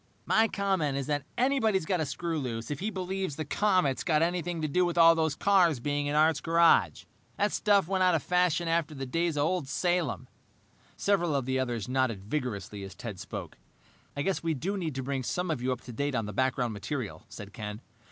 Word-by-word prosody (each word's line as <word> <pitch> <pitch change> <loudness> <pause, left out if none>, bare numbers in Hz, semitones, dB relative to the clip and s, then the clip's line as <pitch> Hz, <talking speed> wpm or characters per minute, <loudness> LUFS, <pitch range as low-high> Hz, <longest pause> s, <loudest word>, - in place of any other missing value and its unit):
"My 225 +1 +4
comment 190 -9 0
is 140 - -2
that 145 -1 -2
anybody's 225 - +2
got 180 +1 0
a 155 - -1
screw 165 +2 -3
loose 115 -2 -4
if 145 - -3
he 205 - -2
believes 190 -4 -3
the 155 - -4
comet's 185 -5 +1
got 155 -2 +2
anything 175 0 -1
to - - +1
do 180 +5 +2
with 175 -1 -1
all 165 0 +8
those 160 -3 0
cars 180 -8 +3
being 145 +3 -1
in 145 - -1
Art's 155 +1 +3
garage. 165 0 +3 0.3
That 205 +1 +1
stuff 200 -5 +3
went 190 0 +1
out 180 -2 +4
of 155 - -1
fashion 180 -1 +1
after 165 -2 0
the 135 -1 -4
days 165 +4 -1
of 145 - +2
old 160 -2 0
Salem." 165 - -1 0.7
Several 175 -6 +1
of 135 -3 0
the 130 0 0
others 120 -5 -2
nodded 125 -6 0
vigorously 105 -5 -4
as 95 -1 -8
Ted 110 -6 -7
spoke. - - -7 0.6
"I 145 - 0
guess 195 +2 0
we 165 -1 -1
do 185 +9 -2
need 165 -7 -3
to 135 - -3
bring 135 0 -2
some 180 +7 -2
of 145 -6 -2
you 130 +1 0
up 125 - -3
to 125 - -10
date 140 +3 -1
on 115 -3 0
the 105 - -6
background 130 0 0
material," 110 +3 -5
said 105 -1 -10
Ken. 105 -1 -6
155 Hz, 220 wpm, -29 LUFS, 130-180 Hz, 0.7 s, all